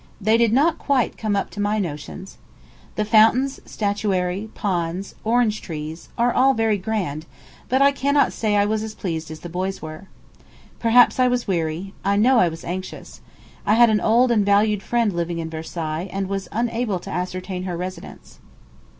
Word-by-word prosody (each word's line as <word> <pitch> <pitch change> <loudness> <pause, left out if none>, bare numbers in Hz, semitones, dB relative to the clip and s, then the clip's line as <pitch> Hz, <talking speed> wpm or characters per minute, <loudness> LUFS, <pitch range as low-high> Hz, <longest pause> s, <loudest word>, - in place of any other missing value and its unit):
They 215 +2 +3
did 230 -1 +3
not 305 +7 +3
quite 270 -4 +1
come 215 -2 -1
up 200 - -2
to 195 - -9
my 205 +1 +1
notions. 175 +1 -6 0.6
The 215 - 0
fountains, 225 +5 +4
statuary, 200 -1 -1
ponds, 180 -1 -2
orange 225 -1 +1
trees, 155 0 -7
are 240 +1 +2
all 270 +1 +4
very 220 -2 +1
grand; 180 -7 -3 0.4
but 260 +2 +3
I 280 - +6
cannot 280 +1 +1
say 215 -2 -1
that 205 - +4
I - - +2
was 215 +1 0
as 215 0 -6
pleased 160 -4 -4
as 155 0 -9
the - - -7
boys 185 +3 -3
were. 155 +5 -9 0.7
Perhaps 240 +2 +5
I 255 - +5
was 245 -1 0
weary; 170 +1 -2
I 200 +1 +2
know 240 +4 +4
I 175 - +4
was 165 0 -9
anxious. 185 +2 -7 0.4
I 210 - +3
had 235 -1 +6
an 210 - +2
old 240 +3 +3
and 215 -3 +3
valued 205 +1 +3
friend 230 -2 0
living 170 0 -2
in 160 -1 -4
Versailles, 160 +2 -4
and 195 0 -2
was 195 0 -4
unable 230 -2 -1
to 175 - -9
ascertain 185 +1 -4
her 180 -2 -3
residence. 185 +1 -8
205 Hz, 185 wpm, -22 LUFS, 180-225 Hz, 0.7 s, I